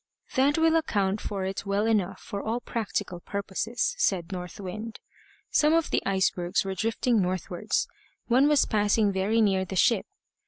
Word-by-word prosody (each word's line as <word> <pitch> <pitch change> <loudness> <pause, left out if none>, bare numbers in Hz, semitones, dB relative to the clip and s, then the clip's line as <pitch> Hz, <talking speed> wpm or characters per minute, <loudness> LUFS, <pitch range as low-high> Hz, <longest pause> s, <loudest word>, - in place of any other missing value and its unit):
"That 275 +3 +3
will 325 0 +4
account 205 -10 0
for 195 -2 -3
it 190 0 -3
well 200 +2 +1
enough 195 -4 0
for 200 - -5
all 225 +2 -2
practical 215 -7 -3
purposes," 210 - -2
said 180 - +1
North 180 -1 -6
Wind. 215 +4 -6 0.5
Some 300 +1 +4
of 330 -1 +1
the - - +2
icebergs 190 -1 +1
were 195 - -2
drifting 225 +2 +1
northwards; 180 -1 -1 0.4
one 255 +4 +4
was 295 -2 +4
passing 210 -1 +2
very 200 +4 +1
near 195 -3 +2
the 190 +1 -6
ship. 210 +3 +3
205 Hz, 160 wpm, -27 LUFS, 190-230 Hz, 0.5 s, will